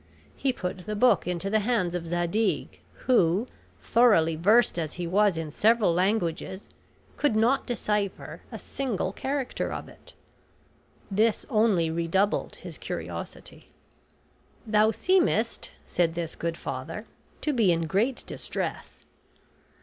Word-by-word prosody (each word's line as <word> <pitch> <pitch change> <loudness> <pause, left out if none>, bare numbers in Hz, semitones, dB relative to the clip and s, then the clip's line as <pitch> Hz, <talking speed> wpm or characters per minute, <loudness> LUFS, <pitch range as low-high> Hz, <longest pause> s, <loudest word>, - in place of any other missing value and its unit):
He 275 - 0
put 180 -5 -5
the 210 - -2
book 245 -1 +3
into 180 +1 -2
the 220 - +3
hands 210 -5 0
of 170 -2 -3
Zadig, 175 +6 -1 0.3
who, 205 -2 +3 0.3
thoroughly 205 -10 +4
versed 210 +4 +4
as 155 -2 -3
he 175 - -4
was 195 +1 +3
in 160 -2 -4
several 215 0 +3
languages, 190 0 -1 0.5
could 290 -7 +2
not 235 +5 +2
decipher 210 -4 -2
a - - -5
single 210 -8 -3
character 270 +1 -2
of - - -5
it. - - -16 1.0
This 215 +2 +2
only 210 -8 +3
redoubled 170 +5 0
his - - -10
curiosity. - - -7 1.0
"Thou 215 0 +4
seemest," 235 - +1 0.2
said 170 -2 0
this 165 -1 -4
good 170 0 -3
father, 145 - -5 0.4
"to 300 - 0
be 220 -8 +4
in 165 -1 +1
great 215 +10 0
distress." - - -5
200 Hz, 125 wpm, -27 LUFS, 170-230 Hz, 1.0 s, thoroughly